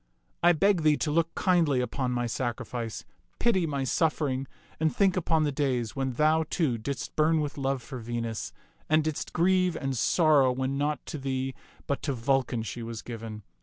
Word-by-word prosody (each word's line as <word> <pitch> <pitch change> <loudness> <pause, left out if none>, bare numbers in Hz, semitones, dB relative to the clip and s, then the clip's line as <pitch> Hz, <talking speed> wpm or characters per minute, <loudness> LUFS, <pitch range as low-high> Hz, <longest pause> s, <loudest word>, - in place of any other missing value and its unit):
I 175 +1 +6
beg 195 +2 +3
thee 155 -1 +4
to 150 - -1
look 165 +1 +1
kindly 170 -8 +3
upon 125 0 -1
my 120 -1 0
sacrifice. 120 -1 -4 0.3
Pity 190 -8 +2
my 140 -2 -1
suffering, 135 -2 0 0.3
and 160 0 +2
think 195 -2 +3
upon 160 -3 +2
the 150 - +1
days 130 -5 -1
when 135 -2 -1
thou, 155 +5 +3
too, 130 -9 0
didst 140 +5 -5
burn 155 +1 +3
with 150 -1 -2
love 135 -2 -1
for 130 +1 -7
Venus 115 -1 -4 0.4
and 155 0 +4
didst 155 -1 -3
grieve 185 0 +2
and 135 -4 -2
sorrow 145 0 +4
when 130 +1 -1
not 145 +1 -1
to 155 - -5
thee 130 0 -2 0.3
but 140 - -2
to 140 - -1
Vulcan 125 -1 0
she 115 +2 -5
was 115 -1 -6
given. 110 -2 -7
140 Hz, 180 wpm, -28 LUFS, 125-155 Hz, 0.4 s, I